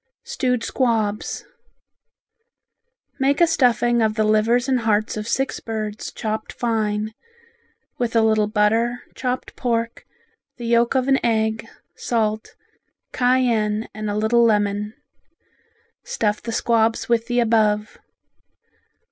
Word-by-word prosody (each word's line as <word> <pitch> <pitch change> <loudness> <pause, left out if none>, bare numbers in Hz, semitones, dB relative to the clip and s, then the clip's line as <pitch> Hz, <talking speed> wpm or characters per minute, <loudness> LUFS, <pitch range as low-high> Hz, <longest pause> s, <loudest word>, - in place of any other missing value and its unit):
Stewed 250 -3 -1
Squabs 220 -5 -1 1.7
Make 275 +1 +2
a 340 - +7
stuffing 240 -5 +2
of 215 -1 +1
the 215 - +1
livers 220 +4 +2
and 260 -2 +2
hearts 215 -1 0
of 210 0 -5
six 270 +2 -1
birds 215 -2 -5
chopped 215 0 -4
fine, 215 -2 -1 0.9
with 235 -1 -1
a 225 - +5
little 215 -1 +3
butter, 225 +3 +1
chopped 255 0 -4
pork, 230 -2 -2 0.5
the 240 - -7
yolk 235 +2 +2
of 260 0 +1
an 270 -1 +2
egg, 220 -1 0 0.3
salt, 220 -2 -2 0.6
cayenne 235 -4 +1
and 215 0 -4
a 205 - -2
little 225 +2 +3
lemon. 210 -1 +1 1.1
Stuff 215 - -1
the 230 - -5
squabs 225 0 +1
with 230 -1 +1
the 245 -1 +1
above. 215 -2 +1
225 Hz, 120 wpm, -22 LUFS, 215-240 Hz, 1.7 s, a